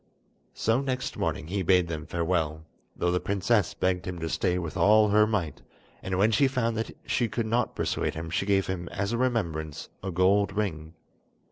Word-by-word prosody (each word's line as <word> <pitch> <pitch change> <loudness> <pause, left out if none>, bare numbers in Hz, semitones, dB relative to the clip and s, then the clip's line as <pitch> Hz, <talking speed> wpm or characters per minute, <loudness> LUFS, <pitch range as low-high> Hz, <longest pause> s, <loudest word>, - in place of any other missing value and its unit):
So 115 +4 +1
next 130 -2 -3
morning - - -2
he 95 +4 -2
bade 90 0 +3
them 80 -1 -5
farewell, 80 -2 -1 0.3
though 90 - 0
the 90 - +1
princess 100 +2 +1
begged 90 0 0
him 90 -1 -4
to 80 - -2
stay 90 +3 0
with 85 -3 -4
all 105 +1 +5
her 105 +1 +5
might; 100 -8 -2 0.4
and 95 -1 -2
when 105 +4 +4
she 135 +6 +4
found 115 -3 0
that 110 - -4
she 120 - +1
could 115 +1 -2
not 115 +1 0
persuade - - -1
him 80 0 -5
she 95 - -1
gave 95 -1 +3
him 90 -2 -4
as 100 +1 -2
a - - 0
remembrance 80 - -2
a 95 - -4
gold 95 +3 +2
ring. 80 -6 -3
95 Hz, 195 wpm, -27 LUFS, 85-110 Hz, 0.4 s, all